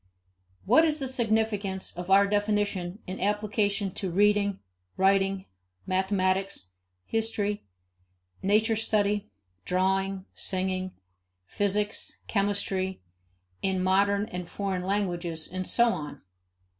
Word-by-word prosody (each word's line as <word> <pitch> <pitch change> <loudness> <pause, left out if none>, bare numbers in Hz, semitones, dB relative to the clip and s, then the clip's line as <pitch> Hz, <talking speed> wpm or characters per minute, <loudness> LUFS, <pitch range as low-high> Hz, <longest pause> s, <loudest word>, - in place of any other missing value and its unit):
What 250 +11 +6
is 310 -2 +2
the 270 -3 -3
significance 220 -5 0
of 175 +1 -6
our 195 +1 +7
definition 205 -2 -1
in 185 +1 -6
application 205 -1 0
to 190 +1 -4
reading, 200 +1 +3 0.4
writing, 195 0 +2 0.4
mathematics, 190 - 0 0.3
history, 210 - -1 0.7
nature 215 +3 +3
study, 210 -2 +1 0.3
drawing, 190 +1 0
singing, 185 0 -1 0.5
physics, 205 - -1
chemistry, 200 -2 0 0.6
modern 195 +2 +2
and 180 -6 -6
foreign 195 -2 -2
languages, 175 -4 -1
and 185 0 -4
so 235 0 +4
on? 150 -8 -5
195 Hz, 95 wpm, -28 LUFS, 185-210 Hz, 0.7 s, our